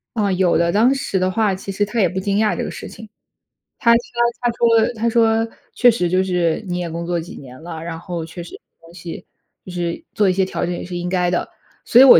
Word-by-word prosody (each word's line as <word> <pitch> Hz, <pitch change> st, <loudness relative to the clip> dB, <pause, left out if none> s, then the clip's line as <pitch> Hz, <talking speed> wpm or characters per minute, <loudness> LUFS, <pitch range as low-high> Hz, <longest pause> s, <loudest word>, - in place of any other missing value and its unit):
啊， 205 Hz, -3 st, +1 dB
有 185 Hz, -1 st, +3 dB
的， 170 Hz, 0 st, +2 dB
当 230 Hz, +8 st, +4 dB
时 200 Hz, -7 st, -1 dB
的 185 Hz, 0 st, +2 dB
话 210 Hz, 0 st, +1 dB
其 195 Hz, +1 st, -5 dB
实 205 Hz, +2 st, 0 dB
他 220 Hz, +3 st, -3 dB
也 185 Hz, -, +4 dB
不 185 Hz, +2 st, -3 dB
惊 200 Hz, +1 st, 0 dB
讶 215 Hz, -1 st, +2 dB
这 -, -, -1 dB
个 -, -, -4 dB
事 -, -, -7 dB
情。 220 Hz, 0 st, -11 dB, 0.7 s
他 235 Hz, -1 st, +5 dB
说 235 Hz, -, +5 dB, 0.4 s
他 240 Hz, -, +2 dB
说 230 Hz, 0 st, +3 dB
他 230 Hz, +1 st, +1 dB
说： 225 Hz, -1 st, +3 dB, 0.3 s
“确 245 Hz, -, +6 dB
实 180 Hz, -6 st, 0 dB
就 185 Hz, +2 st, +2 dB
是 180 Hz, -1 st, 0 dB
你 180 Hz, 0 st, -2 dB
也 175 Hz, -, -3 dB
工 170 Hz, +1 st, -4 dB
作 175 Hz, 0 st, -1 dB
几 165 Hz, -, -8 dB
年 130 Hz, +1 st, -11 dB
了， 165 Hz, -1 st, -7 dB
然 165 Hz, -1 st, -5 dB
后 170 Hz, -2 st, -5 dB
确 170 Hz, +2 st, -8 dB
实 170 Hz, -, -10 dB, 0.2 s
东 165 Hz, +1 st, -16 dB
西 175 Hz, -1 st, -8 dB, 0.4 s
就 185 Hz, -, -8 dB
是 175 Hz, -1 st, -3 dB
做 205 Hz, -3 st, +3 dB
一 -, -, +3 dB
些 190 Hz, +1 st, +2 dB
调 190 Hz, -, -3 dB
整 175 Hz, -, -2 dB
也 -, -, -5 dB
是 180 Hz, -, -6 dB
应 175 Hz, -, -3 dB
该 180 Hz, -1 st, +1 dB
的。” 175 Hz, -, -1 dB, 0.4 s
所 245 Hz, -, +7 dB
以 -, -, +11 dB
我 270 Hz, -, +10 dB
185 Hz, 275 characters per minute, -20 LUFS, 175-220 Hz, 0.7 s, 以